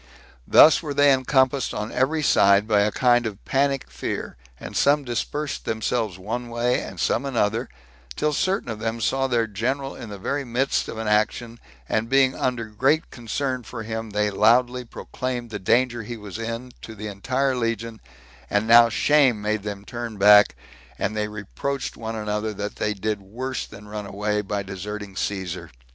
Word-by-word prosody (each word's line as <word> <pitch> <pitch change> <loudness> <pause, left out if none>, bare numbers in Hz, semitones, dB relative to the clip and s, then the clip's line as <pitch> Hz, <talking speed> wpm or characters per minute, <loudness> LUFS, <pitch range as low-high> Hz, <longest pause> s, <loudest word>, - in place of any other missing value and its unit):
Thus 155 - +7
were 150 -4 -5
they 145 0 +6
encompassed 130 0 +1
on 105 +1 -4
every 150 +5 +1
side 100 -5 +4
by 105 -2 +3
a 105 +1 +2
kind 120 0 +3
of 105 -2 -8
panic 135 0 +1
fear, 65 0 -5 0.2
and - - -8
some 145 +1 +3
dispersed 140 +4 -3
themselves 110 -3 -1
one 115 +6 -4
way, 120 +1 +1
and - - -8
some 120 - +1
another, 115 -4 0 0.5
till 150 0 0
certain 185 -1 0
of 110 - -6
them 115 +1 -2
saw 135 +4 +1
their 120 -3 +1
general 130 +6 -2
in 115 - -8
the 100 - -7
very 140 +9 -2
midst 130 +2 0
of - - -6
an 110 -1 -3
action, 115 +2 0 0.3
and 110 +1 -1
being 135 -1 +4
under 125 -3 -1
great 130 +9 +1
concern 130 +2 -3
for 115 -1 -7
him, 110 0 -4
they 105 0 0
loudly 120 +5 +3
proclaimed 125 0 -5
the 105 - -4
danger 120 +4 +2
he 115 +2 -7
was 105 0 -8
in 115 +2 -5
to 110 - -9
the 105 0 -7
entire 130 +7 -1
legion; 115 -2 -3 0.5
and 105 +2 +1
now 115 0 +8
shame 135 -2 +3
made 105 0 -1
them 100 -1 -6
turn 120 -2 -6
back, 105 -3 +7 0.4
and 110 - -2
they 105 0 -1
reproached 110 +6 -4
one 115 0 -5
another 105 0 -2
that 105 +1 -5
they 105 0 -1
did 105 +1 -2
worse 125 +7 -5
than 105 +1 -12
run 105 -1 -6
away, 105 +1 -1
by 100 0 -3
deserting 100 +1 -7
Caesar. 95 -4 -3
115 Hz, 180 wpm, -24 LUFS, 105-130 Hz, 0.5 s, now